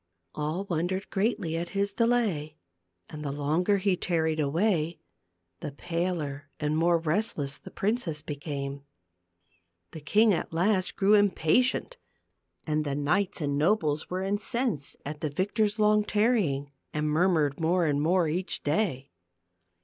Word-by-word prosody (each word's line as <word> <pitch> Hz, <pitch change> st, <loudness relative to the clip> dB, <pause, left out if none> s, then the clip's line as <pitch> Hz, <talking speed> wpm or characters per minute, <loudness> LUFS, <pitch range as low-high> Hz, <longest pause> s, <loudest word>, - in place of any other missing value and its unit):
All 155 Hz, +5 st, -2 dB
wondered 180 Hz, +3 st, -2 dB
greatly 195 Hz, -5 st, 0 dB
at 170 Hz, +1 st, -3 dB
his 200 Hz, 0 st, +1 dB
delay, 215 Hz, -11 st, +1 dB, 0.5 s
and 150 Hz, -1 st, -8 dB
the 140 Hz, -, -2 dB
longer 155 Hz, +8 st, +1 dB
he 195 Hz, -1 st, +1 dB
tarried 160 Hz, -3 st, 0 dB
away, 165 Hz, +2 st, +1 dB, 0.6 s
the 145 Hz, -, -6 dB
paler 155 Hz, -4 st, -3 dB
and 150 Hz, +1 st, 0 dB
more 170 Hz, +2 st, +3 dB
restless 155 Hz, -4 st, -1 dB
the -, -, -11 dB
princess 195 Hz, -8 st, -2 dB
became. 140 Hz, -2 st, -5 dB, 1.1 s
The 160 Hz, -, -8 dB
king 210 Hz, +8 st, +4 dB
at 170 Hz, -, -2 dB
last 185 Hz, +3 st, +1 dB
grew 200 Hz, +2 st, +3 dB
im 205 Hz, -1 st, +5 dB
patient 250 Hz, -, +1 dB, 0.7 s
and 155 Hz, -1 st, 0 dB
the 140 Hz, -2 st, -2 dB
knights 175 Hz, +7 st, 0 dB
and 140 Hz, -1 st, 0 dB
nobles 155 Hz, -3 st, +1 dB
were 185 Hz, +1 st, -2 dB
incensed 205 Hz, -, -1 dB
at 150 Hz, +1 st, -6 dB
the 155 Hz, -, -1 dB
victor's 205 Hz, +7 st, 0 dB
long 210 Hz, 0 st, +4 dB
tarrying, 205 Hz, -, +1 dB, 0.2 s
and 150 Hz, 0 st, -1 dB
murmured 155 Hz, -3 st, +2 dB
more 170 Hz, +2 st, +2 dB
and 145 Hz, -2 st, +1 dB
more 175 Hz, +2 st, +3 dB
each 180 Hz, +4 st, -2 dB
day. 145 Hz, -4 st, -1 dB
165 Hz, 140 wpm, -28 LUFS, 150-200 Hz, 1.1 s, im